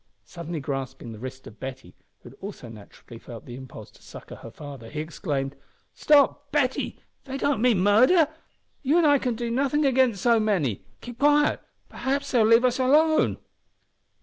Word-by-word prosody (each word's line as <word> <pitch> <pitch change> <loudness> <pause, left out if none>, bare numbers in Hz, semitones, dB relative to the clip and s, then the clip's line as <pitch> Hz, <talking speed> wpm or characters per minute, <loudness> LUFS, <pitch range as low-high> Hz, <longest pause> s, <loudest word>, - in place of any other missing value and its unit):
Suddenly 170 -2 -6
grasping 135 -4 -5
the 110 - -10
wrist 130 +2 -8
of 110 - -13
Betty, 130 0 -8 0.3
who - - -12
had 135 - -18
also 190 - -8
naturally 115 +2 -13
felt 115 -1 -11
the 120 - -9
impulse 125 -5 -11
to - - -22
succour - - -11
her 115 - -10
father, 135 -3 -10
he 150 - -6
exclaimed 145 -4 -3 0.4
"Stop! 285 -1 +3
Betty. 275 -3 0 0.3
They 270 -1 -5
don't 275 -5 0
mean 235 -6 +3
murder. 255 - +5 0.5
You 290 +4 +2
an' 345 - +4
I 290 -2 +5
can 250 -3 -1
do 235 0 -3
nothing 280 +4 +1
against 260 -6 +2
so 235 +1 +3
many. 180 - 0 0.2
Keep 245 0 -10
quiet; 295 +1 +3 0.3
p'r'aps 280 +1 -3
they'll 230 -4 +4
leave 230 +2 +5
us 250 +1 +1
alone." 305 +5 +3
220 Hz, 175 wpm, -25 LUFS, -, 0.5 s, murder